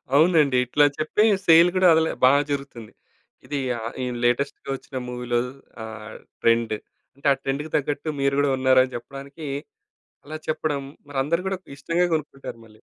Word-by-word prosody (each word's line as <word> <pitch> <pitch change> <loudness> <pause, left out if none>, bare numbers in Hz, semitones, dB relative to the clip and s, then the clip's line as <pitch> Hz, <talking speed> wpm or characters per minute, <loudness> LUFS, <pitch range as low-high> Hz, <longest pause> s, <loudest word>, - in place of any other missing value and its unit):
అవునండి. 155 -4 +4
ఇట్లా 145 +4 +4
చెప్పి 155 +7 +1 0.2
సేల్ 165 +1 +8
కూడా 185 -1 +5
అదేలే 160 0 +2
బాగా 140 +3 +6
జరుగుతుంది. 135 -6 -5 0.5
ఇది 145 -1 -3 0.2
ఆహ్, 115 0 -6 0.3
లేటెస్ట్‌గా 125 +5 0
వచ్చిన 135 0 -8
మూవీ‌లో 125 -1 -1 0.4
ఆహ్, 110 -1 -9 0.3
ట్రెండ్. 115 -1 +2 0.4
అంటే 140 - -4
ఆ - - -3
ట్రెండ్‌కి 145 +3 -3
తగ్గట్టు 145 +2 -2
మీరు 140 0 +2
కూడా 145 -1 +2
ఉన్నారని 130 0 +3
చెప్పడానికి, 140 +5 -8 0.8
అలా 155 +1 -6
చెప్పడం 155 -2 -1 0.3
మరి 145 -2 -5
అందరూ 170 +5 0
కూడా 190 - -2 0.2
ఇష్టంగా 170 +5 0
కొనుక్కుంటారు 145 -5 -5
మళ్ళీ. 110 -1 -19
140 Hz, 145 wpm, -24 LUFS, 125-155 Hz, 0.8 s, సేల్